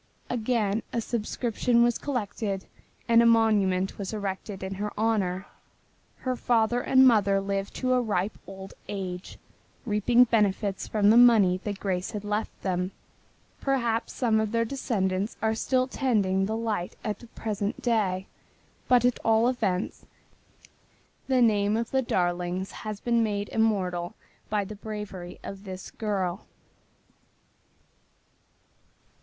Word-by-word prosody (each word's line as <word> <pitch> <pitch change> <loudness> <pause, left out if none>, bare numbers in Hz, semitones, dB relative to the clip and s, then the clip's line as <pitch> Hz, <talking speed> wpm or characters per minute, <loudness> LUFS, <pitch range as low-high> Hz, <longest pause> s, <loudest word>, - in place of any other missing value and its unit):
Again 225 -3 0
a 235 - -1
subscription 235 +1 0
was 240 -1 +2
collected 210 -7 -3 0.4
and 230 0 +6
a - - +4
monument 205 -5 +3
was 195 +1 -4
erected 195 -1 -4
in 190 0 -4
her 210 0 -2
honor. 200 -4 0 0.8
Her 255 -1 -1
father 240 0 +2
and 260 +1 +6
mother 200 -4 +4
lived 195 0 -3
to 255 -1 +1
a 250 - +3
ripe 205 -3 -1
old 190 0 -9 0.2
age, 185 -2 -5 0.5
reaping 235 +3 +4
benefits 205 -4 +1
from 210 -1 +3
the 230 - +6
money 215 -7 +6
that 205 -2 -3
Grace 185 -2 -2
had 210 -1 -4
left 210 +1 -3
them. 180 0 -1 0.7
Perhaps 235 -4 0
some 225 -4 +2
of 220 -1 -1
their 230 0 +1
descendants 210 -6 -1
are 220 0 +1
still 255 +3 +1
tending 200 -8 +1
the 220 +1 -2
light 215 -6 -2
at 210 -1 -3
the 240 - -13
present 210 -2 -3
day, 200 -6 +1 0.6
but 245 -1 +4
at 245 - +2
all 225 +1 +4
events 210 -7 -1 1.2
the 260 -2 +4
name 210 -1 +3
of 230 0 -3
the 265 - +2
Darlings 180 -3 -1
has 215 -2 -6
been 235 0 +1
made 205 -2 -1
immortal 185 -6 0 0.3
by 210 -2 0
the 210 - -7
bravery 205 -4 -7
of 195 0 -8
this 185 -2 -8
girl. 195 -4 -2
210 Hz, 135 wpm, -27 LUFS, 195-230 Hz, 1.2 s, and